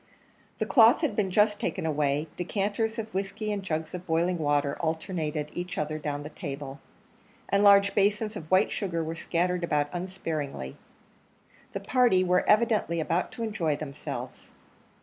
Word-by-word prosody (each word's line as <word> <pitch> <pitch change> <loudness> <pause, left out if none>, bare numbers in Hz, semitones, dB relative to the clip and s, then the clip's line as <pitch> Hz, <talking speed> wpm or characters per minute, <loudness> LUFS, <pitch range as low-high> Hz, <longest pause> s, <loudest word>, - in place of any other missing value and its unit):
The - - -1
cloth 230 0 +6
had 310 - 0
been 205 -4 +1
just 210 +2 +3
taken 165 - -2
away, 150 -1 +1
decanters 205 +5 -1
of 220 -1 -5
whiskey 200 +3 -3
and 205 -1 -2
jugs 160 -3 -3
of 180 0 -7
boiling 170 +2 +1
water 145 -2 +1
alternated 160 -2 -2
each 180 +1 -5
other 155 +1 -2
down 145 -1 -3
the 150 - -8
table, 140 -2 -6 0.7
and 200 +1 +3
large 200 0 +6
basins 210 +2 +1
of 160 -6 -8
white 185 +2 +4
sugar 170 -5 -2
were 160 +1 -3
scattered 175 +2 -1
about 150 -3 +1
unsparingly. 160 - -4 1.0
The 195 - -4
party 225 -3 +3
were 180 0 +2
evidently 210 -6 +3
about 165 +3 0
to 235 - -5
enjoy 175 -9 0
themselves. 145 -1 -7
180 Hz, 155 wpm, -28 LUFS, 155-205 Hz, 1.0 s, cloth